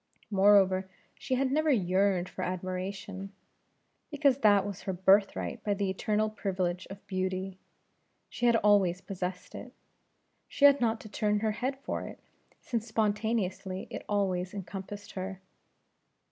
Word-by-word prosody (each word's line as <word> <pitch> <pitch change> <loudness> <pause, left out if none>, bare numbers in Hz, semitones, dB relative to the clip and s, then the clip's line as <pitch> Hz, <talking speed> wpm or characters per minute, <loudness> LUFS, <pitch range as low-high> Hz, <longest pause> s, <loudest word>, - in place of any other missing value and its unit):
Moreover, 190 -1 +4 0.2
she 260 - -2
had 260 0 +1
never 310 +2 +2
yearned 190 -5 +2
for - - -7
admiration; 190 +2 -4 0.8
because 280 -3 +2
that 205 -5 +5
was 200 -2 -6
her 190 - -3
birthright 195 +2 +2
by 205 -2 0
the 195 -1 -1
eternal 210 +3 0
privilege 185 -4 -2
of 195 +1 -10
beauty; 185 0 -3 0.7
she 245 - -1
had 235 - +5
always 200 -5 +3
possessed 185 -2 -5
it; - - -9 0.7
she 285 - +2
had 280 -1 +7
not 225 -1 +1
to - - -10
turn 210 0 0
her 220 -1 +1
head 255 +5 -2
for - - -3
it, - - -10 0.4
since 230 -2 -3
spontaneously 210 -3 -1
it - - -6
always 190 -2 0
encompassed 195 +1 -7
her. 190 0 -5
200 Hz, 140 wpm, -30 LUFS, 185-215 Hz, 0.8 s, had